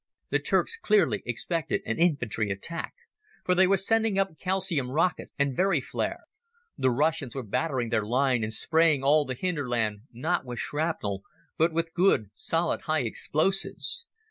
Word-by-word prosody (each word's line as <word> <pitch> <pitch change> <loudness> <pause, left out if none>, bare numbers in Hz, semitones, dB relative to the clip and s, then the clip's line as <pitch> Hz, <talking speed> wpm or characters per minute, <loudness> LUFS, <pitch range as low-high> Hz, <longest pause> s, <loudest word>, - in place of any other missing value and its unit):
The - - +3
Turks 455 - 0
clearly 215 - +2
expected 155 +7 -2
an 115 - -2
infantry 125 - +1
attack, 100 +13 -4 0.5
for 180 - +3
they 185 +1 +5
were 195 +1 +4
sending 220 +1 +1
up 195 -6 -1
calcium 185 -8 0
rockets 165 +7 0
and 140 -2 +1
Very 195 +5 +2
flares. - - -3 0.5
The 130 - +2
Russians 145 +1 0
were 135 - -3
battering 125 +2 -1
their 110 -1 +1
line 125 +3 +1
and 110 - -2
spraying 160 +3 +2
all 145 +2 +4
the 130 -1 -4
hinterland, 120 - -2
not 160 +9 -1
with 125 -2 -7
shrapnel, 145 -12 -2 0.3
but 165 +2 +3
with 165 0 -2
good, 170 - +2
solid 165 +1 -1
high 155 -3 +1
explosives. 190 - 0
155 Hz, 155 wpm, -27 LUFS, 125-175 Hz, 0.5 s, they